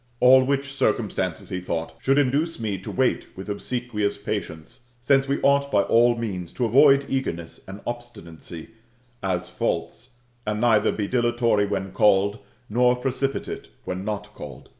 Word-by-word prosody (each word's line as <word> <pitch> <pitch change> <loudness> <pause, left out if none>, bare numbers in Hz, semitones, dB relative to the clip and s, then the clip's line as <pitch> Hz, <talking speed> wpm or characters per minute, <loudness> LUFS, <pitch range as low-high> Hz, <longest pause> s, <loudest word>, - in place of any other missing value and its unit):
All 130 +1 +7
which 140 +1 -1
circumstances, 95 -9 -1
he 90 -2 -3
thought, 80 -2 -4
should 135 +1 +2
induce 145 +4 +1
me 105 -4 -2
to 95 - -8
wait 130 -1 0
with 95 +2 -7
obsequious 105 0 -2
patience, 80 +8 -6
since 135 +2 +2
we 140 +1 0
ought 140 0 +3
by 100 -4 +4
all 120 +2 +4
means 95 -7 -5
to 125 - -1
avoid 140 +4 +5
eagerness 85 -12 -4
and 95 +1 -9
obstinacy, 85 -9 -8 0.5
as 90 -2 -2
faults, - - -3 0.3
and 105 -1 -2
neither 110 -2 +3
be 105 -2 -3
dilatory 120 -3 +2
when 95 -1 -3
called, 100 +1 +3 0.3
nor 125 +3 +3
precipitate 135 +2 -3 0.2
when 90 +1 -4
not 105 0 -4
called. - - -10
115 Hz, 150 wpm, -24 LUFS, 100-130 Hz, 0.5 s, All